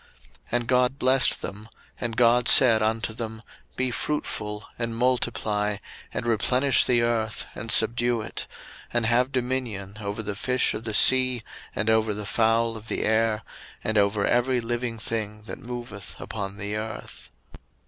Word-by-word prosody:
01:001:028 - - -27 0.4
And 120 -1 0
God 125 +1 +2
blessed 130 0 +3
them, 105 +3 -7 0.3
and 115 -2 -3
God 120 0 +4
said 115 -4 +7
unto 110 +1 -1
them, 110 -1 -6 0.3
Be 130 0 0
fruitful, 105 -5 -4
and 115 -1 -3
multiply, 110 -4 0 0.3
and - - -4
replenish 125 +4 +3
the 120 -2 +3
earth, 115 -2 -1
and 115 - -7
subdue 120 +2 +4
it: - - -6 0.4
and 120 -1 0
have 125 +3 +2
dominion 120 -6 -2
over 105 +2 -4
the 105 0 -3
fish 125 +5 0
of 110 +1 -6
the 110 -2 -2
sea, 130 0 +5 0.3
and 105 - -2
over 110 -1 +2
the 105 0 -6
fowl 115 +1 +1
of 110 0 -10
the - - -2
air, 110 0 +1 0.4
and 110 - -1
over 100 0 +2
every 125 +1 +2
living 120 0 -3
thing 105 -1 -4
that 110 - -8
moveth 120 -5 -7
upon 100 0 -6
the 105 0 -3
earth. 110 +1 -7
115 Hz, 160 wpm, -25 LUFS, 110-120 Hz, 0.4 s, said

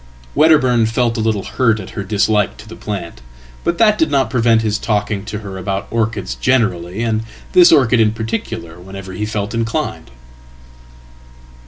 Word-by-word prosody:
Wedderburn 130 -7 +4
felt 115 +1 0
a - - -3
little 110 -3 0
hurt 115 -5 +1
at 95 - -8
her 100 - -5
dislike 105 0 +1
to - - -13
the - - -9
plant. 100 -9 -6 0.4
But 170 - 0
that 215 -2 +4
didnot 140 -6 +2
prevent 115 -3 +3
his 105 -1 0
talking 105 -2 -1
to 110 0 -5
her 95 -2 -7
about 95 +1 -3
orchids 115 -3 -1
generally, 105 -6 0
and 110 -2 0 0.3
this 180 -1 +7
orchid 125 -6 +4
inparticular, 110 -5 -2
whenever 95 +1 -9
he 105 +3 -3
felt 105 -1 -3
inclined." 115 - -2
110 Hz, 155 wpm, -17 LUFS, 100-115 Hz, 0.4 s, this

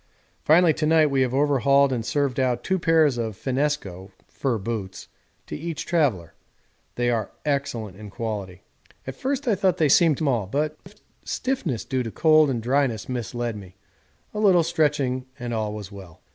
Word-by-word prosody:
Finally 165 +1 +5
to 155 0 -1
night 155 -2 +4
we 135 -1 +2
have 130 -2 +1
overhauled 140 0 +3
and 120 -3 -2
served 140 +1 -1
out 125 -2 0
two 190 0 0
pairs 160 -7 +3
of 110 -4 -3
finnesko 130 -9 -2 0.2
(fur 130 -4 -2
boots) 100 -2 -5 0.4
to - - -6
each 165 0 -5
traveller. 135 - 0 0.6
They 120 0 +1
are 110 -4 -1 0.2
excellent 125 -9 -2
in 105 0 -10
quality. 100 -5 -5 0.4
At 135 - -5
first 270 - -3
I 230 - +4
thought 190 -2 +1
they 155 -3 +2
seemed 155 0 +5
small, 125 -10 0
but 150 +7 -1
a 210 +2 -24
stiffness 195 - -2
due 130 -1 -1
to 115 - -4
cold 155 +4 +4
and 120 -4 -2
dryness 125 -4 0
misled 120 -1 -3
me 95 -3 -11 0.6
a 210 - -4
little 190 -5 +5
stretching 145 -6 0
and 120 -3 -5
all 110 -2 -2
was 105 -1 -7
well. 95 -5 -12
130 Hz, 170 wpm, -24 LUFS, 110-155 Hz, 0.6 s, Finally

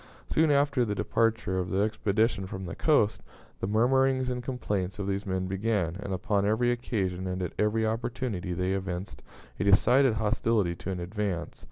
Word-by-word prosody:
Soon 160 0 +2
after 140 -2 +3
the 105 -3 -1
departure 115 -4 0
of 90 - -2
the 100 +1 +1
expedition 110 -1 0
from 95 0 -6
the 85 - -5
coast, 145 -10 +2 0.4
the - - -2
murmurings 130 +4 +2
and 125 0 -3
complaints 105 -7 -3
of 100 - -3
these 100 +1 -2
men 95 -1 -1
began, 95 -3 -1
and 100 - -5
upon 100 +1 0
every 110 +4 +2
occasion 95 -7 -2
and 90 0 -2
at 90 - -4
every 110 +1 +2
opportunity 115 -4 -2
they 90 +2 -1
evinced 95 -1 -4 0.4
a - - +1
decided 120 +5 +4
hostility 110 -3 +1
to 85 - -7
an 95 -2 -3
advance. 90 -1 -3
105 Hz, 175 wpm, -28 LUFS, 95-120 Hz, 0.4 s, decided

